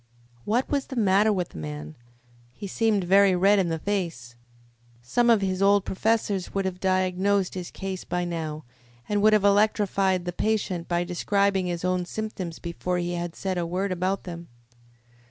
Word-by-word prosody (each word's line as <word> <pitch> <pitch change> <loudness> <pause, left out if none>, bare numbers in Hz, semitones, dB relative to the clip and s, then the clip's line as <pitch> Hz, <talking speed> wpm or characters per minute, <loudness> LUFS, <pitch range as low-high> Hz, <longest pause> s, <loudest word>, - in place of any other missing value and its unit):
What 235 +5 +1
was 280 -2 -1
the 265 - -7
matter 210 -1 +3
with 180 -4 -1
the - - -10
man? 75 0 -7 0.6
He 200 - -8
seemed 210 0 +1
very 195 +1 +5
red 195 +3 +4
in 180 -3 +1
the 165 - -1
face. 165 -11 -3 0.7
Some 240 - +2
of 225 -3 +5
his 190 -1 -1
old 200 0 +4
professors 205 -2 -1
would 195 -1 0
have 185 -1 -3
diagnosed 185 +1 +1
his 180 -2 -5
case 190 -1 -5
by 180 0 -2
now, 160 -3 -4 0.4
and 205 -1 0
would 215 +1 +5
have 210 -2 +4
electrified 200 -3 +2
the 175 - -3
patient 195 -5 -1
by 175 0 0
describing 195 +1 0
his 175 0 -3
own 185 -1 0
symptoms 185 -5 -5
before 180 +1 -3
he 175 0 -2
had 175 -1 -4
said 190 -2 -2
a 170 - -1
word 185 +3 -2
about 185 +2 -1
them. 170 -1 -8
185 Hz, 175 wpm, -25 LUFS, 175-200 Hz, 0.7 s, very